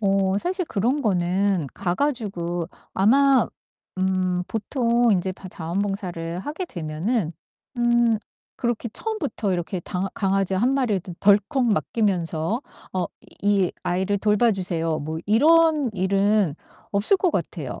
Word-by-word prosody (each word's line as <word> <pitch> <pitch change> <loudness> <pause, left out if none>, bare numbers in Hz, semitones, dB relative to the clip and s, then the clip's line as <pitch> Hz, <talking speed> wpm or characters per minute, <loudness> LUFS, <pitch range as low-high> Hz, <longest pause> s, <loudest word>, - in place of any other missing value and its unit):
어 195 -1 +2
사실 365 - 0
그런 245 +7 0
거는 185 - +1
가 180 -2 -2
가지고 185 - -2 0.2
아마 265 +5 +4 0.5
음 185 -1 +1
보통 235 +1 +1
인제 190 0 0
바 185 0 -11
자원 170 +1 -4
봉사를 180 -4 -3
하게 300 - -4
되면은 170 - -2 0.5
음 240 -2 +3 0.4
그렇게 240 -1 -2
처음부터 290 - -2
이렇게 175 +1 -2
당아 185 +2 -3
강아지 195 -1 0
1 240 +8 +2
마리를 240 -8 +1 0.2
덜컥 210 +7 +3
맡기면서 200 -3 0 0.3
"어 185 -1 0 0.4
이 200 -3 +2
아이를 190 +3 0
돌봐 210 +3 +3
주세요." 165 -4 -1
뭐 155 +2 -4
이런 305 +4 +4
일은 195 -2 +2 0.4
없을 205 - +3
것 365 -2 +1
같아요. 155 -6 -3
200 Hz, 255 characters per minute, -24 LUFS, 180-235 Hz, 0.5 s, 아마